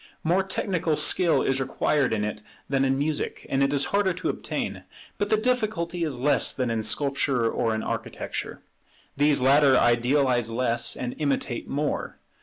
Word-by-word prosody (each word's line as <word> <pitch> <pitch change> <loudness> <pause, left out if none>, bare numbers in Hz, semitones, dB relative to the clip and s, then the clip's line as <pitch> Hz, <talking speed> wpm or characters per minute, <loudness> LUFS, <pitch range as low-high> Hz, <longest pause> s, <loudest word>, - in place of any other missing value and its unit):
More 175 +4 +2
technical 185 -4 -1
skill 165 -3 +3
is 135 0 0
required 140 +1 0
in 105 -2 0
it 105 0 -4 0.3
than 135 -1 +1
in 135 0 +1
music, 150 +1 -3
and 135 - +1
it 140 0 +2
is 145 -1 +2
harder 200 -2 +2
to 180 +2 -3
obtain; - - -4 0.4
but 205 - -1
the 215 - +3
difficulty 215 -8 -1
is 150 -6 -2
less 145 +3 +2
than 125 -3 -1
in 115 -1 -1
Sculpture 135 -1 +1
or 115 0 0
in 110 - -3
Architecture. - - -5 0.5
These 145 -1 +3
latter 140 0 +5
idealize 120 0 +2
less, 115 0 0
and 125 -1 -4
imitate 140 -4 -2
more. 145 +1 -3
140 Hz, 165 wpm, -25 LUFS, 125-165 Hz, 0.5 s, latter